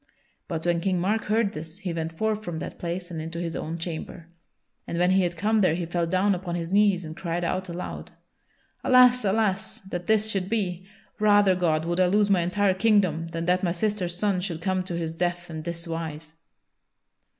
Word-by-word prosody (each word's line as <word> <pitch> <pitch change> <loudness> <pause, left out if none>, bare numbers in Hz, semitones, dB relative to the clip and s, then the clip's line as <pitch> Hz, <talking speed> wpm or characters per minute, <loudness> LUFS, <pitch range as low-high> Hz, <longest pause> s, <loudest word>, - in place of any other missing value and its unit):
But 165 -3 -4
when 170 -1 +2
King 185 -1 +1
Mark 210 +5 0
heard 215 -1 +1
this 160 +3 -8
he 190 -4 -4
went 165 0 -3
forth 215 +5 -1
from 175 -5 -4
that - - -6
place 175 +1 -4
and 160 -2 -4
into 165 +1 -6
his 170 -2 -3
own 165 +2 -4
chamber. 165 0 -6 0.6
And 170 - -3
when 180 +1 +3
he 190 +1 +4
had 175 -2 -1
come 215 +3 +2
there 175 -4 +3
he 175 0 -2
fell 170 0 -1
down 185 +3 +2
upon 175 -1 -3
his 170 0 -4
knees 200 -3 +3
and 160 0 -7
cried 170 0 -3
out 185 +2 -2
aloud: 175 +1 -6 0.7
"Alas, 250 -1 +6
alas, 200 -1 0
that 180 -2 -6
this 220 0 +3
should 190 -2 -1
be! 185 -5 -2 0.3
Rather, 205 -2 +5
God, 165 -3 +1
would 175 +1 -1
I 185 - +5
lose 205 +2 +3
my 185 -3 +4
entire 190 +3 +2
kingdom 185 -5 +2
than 165 0 -4
that 180 +1 +2
my 175 - +1
sister's 180 -1 -1
son 195 -2 +1
should 175 -4 -3
come 185 +2 0
to 175 -3 -3
his 165 -1 -3
death 175 0 -2
in 160 -1 -5
this 170 +1 -5
wise!" 160 -1 -5
180 Hz, 205 wpm, -26 LUFS, 170-200 Hz, 0.7 s, Alas